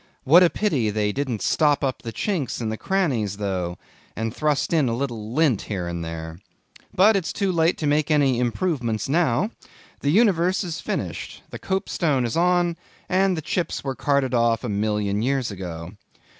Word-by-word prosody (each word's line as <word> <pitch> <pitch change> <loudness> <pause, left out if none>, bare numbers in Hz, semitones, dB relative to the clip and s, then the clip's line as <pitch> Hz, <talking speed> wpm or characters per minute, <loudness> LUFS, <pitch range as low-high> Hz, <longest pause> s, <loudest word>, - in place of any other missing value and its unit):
What 160 +6 +7
a 180 - +6
pity 150 - 0
they 105 0 0
didn't 130 -4 -3
stop 150 -2 +2
up 130 -2 -1
the 115 - -6
chinks 160 - -2
and 110 -2 -2
the - - -2
crannies 125 - -1
though, 90 -4 -2 0.4
and 115 +1 -3
thrust 150 +1 0
in 150 -6 +3
a 115 - -1
little 115 -5 -4
lint 145 -8 +2
here 95 -4 -2
and 85 -1 -4
there. 80 0 -6 0.5
But 205 +4 +5
it's 190 -4 -1
too 200 -3 0
late 165 0 +2
to 155 - -3
make 150 +1 +2
any 140 -5 +3
improvements 125 - -1
now. 160 - +1 0.5
The 140 - -1
universe 185 -1 +3
is 170 -3 -5
finished; - - -4
the - - -7
copestone 170 -8 0
is 115 - -2
on, 175 0 +2 0.3
and 190 -1 +2
the 160 - -4
chips 175 +3 -2
were 135 -1 -2
carted 140 -1 0
off 115 -1 +2
a 120 - -3
million 105 0 0
years 130 -1 0
ago. 90 -3 -6
135 Hz, 180 wpm, -23 LUFS, 110-170 Hz, 0.5 s, What